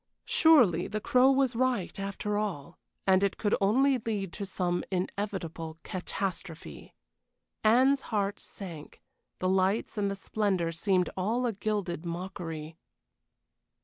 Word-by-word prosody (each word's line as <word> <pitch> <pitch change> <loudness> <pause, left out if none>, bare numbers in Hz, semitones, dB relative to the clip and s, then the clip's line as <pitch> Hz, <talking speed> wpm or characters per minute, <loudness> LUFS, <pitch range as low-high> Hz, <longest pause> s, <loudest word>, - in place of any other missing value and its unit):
Surely 310 - +5
the 215 - -3
Crow 255 +2 +4
was 270 -2 +2
right, 245 -7 0
after 200 +1 -3
all, 175 -7 -3 0.3
and 190 0 +4
it 200 - +1
could 205 - 0
only 260 +7 +3
lead 205 -5 -3
to 200 - -5
some 180 -2 -1
inevitable 180 -4 -3
catastrophe. 185 -2 -5 0.7
Anne's 260 +5 +5
heart 200 -2 -1
sank; 170 -7 -9 0.4
the 185 - -1
lights 190 +3 +1
and 200 -1 +1
the 195 - -2
splendor 195 -4 -1
seemed 180 +2 +1
all 225 +7 0
a 235 - 0
gilded 195 -5 -2
mockery. 165 -2 -6
195 Hz, 125 wpm, -29 LUFS, 180-220 Hz, 0.7 s, Surely